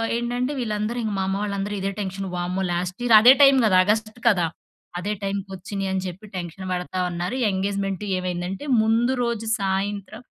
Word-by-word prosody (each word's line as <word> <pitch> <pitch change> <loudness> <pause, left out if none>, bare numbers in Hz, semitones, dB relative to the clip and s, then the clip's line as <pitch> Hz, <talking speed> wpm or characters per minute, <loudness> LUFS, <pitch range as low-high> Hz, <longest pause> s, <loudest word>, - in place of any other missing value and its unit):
ఏంటంటే, 245 +3 -1
వీళ్ళందరూ, 215 0 -2
ఇంక 215 - -1
మా - - +1
అమ్మ 195 +1 -1
వాళ్ళందరూ 200 0 -3
ఇదే 195 +1 -2
టెన్షన్. 195 0 -4
వామ్మో! 180 +2 -2
లాస్ట్ 180 +4 -3
ఇయర్ 230 -2 +6
అదే 250 +3 +9
టైమ్ 275 -1 +8
గదా! 185 -3 +4
ఆగస్ట్‌కి 220 +2 -1
కదా! 180 -5 +2 0.5
అదే 205 +3 -3
టైమ్‌కొచ్చినియి 195 0 -4
అని 190 - 0
చెప్పి 185 +4 -8
టెన్షన్ 180 +2 -6
పడతా 180 +1 -3
ఉన్నారు. 175 +7 -3 0.2
ఎంగేజ్‌మెంటు 195 0 -2
ఏమైందంటే, 180 +6 -4 0.2
ముందు 230 +4 +2
రోజు 230 -2 -2
సాయంత్రం 200 +3 -2
195 Hz, 160 wpm, -23 LUFS, 185-220 Hz, 0.5 s, అదే